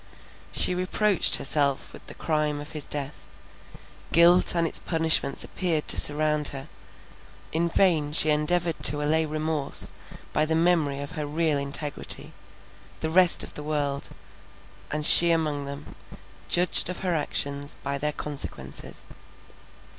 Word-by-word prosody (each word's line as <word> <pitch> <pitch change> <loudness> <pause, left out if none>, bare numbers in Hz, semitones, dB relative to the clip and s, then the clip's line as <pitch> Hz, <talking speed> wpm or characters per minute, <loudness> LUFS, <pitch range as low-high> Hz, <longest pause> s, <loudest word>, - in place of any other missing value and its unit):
She - - +2
reproached 185 +2 +3
herself 140 -1 -1
with - - -15
the - - -10
crime 150 -2 -2
of 145 +2 -9
his 155 -2 -6
death; 145 -1 -5 0.8
guilt 175 +2 +4
and 170 -1 +1
its - - -1
punishments 160 -4 0
appeared 165 -5 -2
to - - +4
surround 150 0 +3
her; 140 +1 -6 0.8
in 170 +2 -1
vain 165 -5 +1
she 155 0 +3
endeavoured 165 +2 -1
to 150 0 +6
allay 160 +2 0
remorse 155 -1 0 0.4
by 155 - +1
the 160 +1 -1
memory 160 -5 0
of 140 - -8
her 150 -2 -6
real 155 -1 -1
integrity; 140 +1 -4 0.7
the 160 - -3
rest 180 0 +4
of - - -9
the - - -8
world, 145 -2 -4 0.8
and 150 0 -3
she 170 +1 +8
among 155 -4 -1
them, 140 +1 -10 0.6
judged 175 0 +3
of 180 - -6
her 185 -2 -1
actions, 145 -2 -2
by 140 0 -4
their 150 +1 -2
consequences. 135 - -6
150 Hz, 140 wpm, -24 LUFS, 145-165 Hz, 0.8 s, she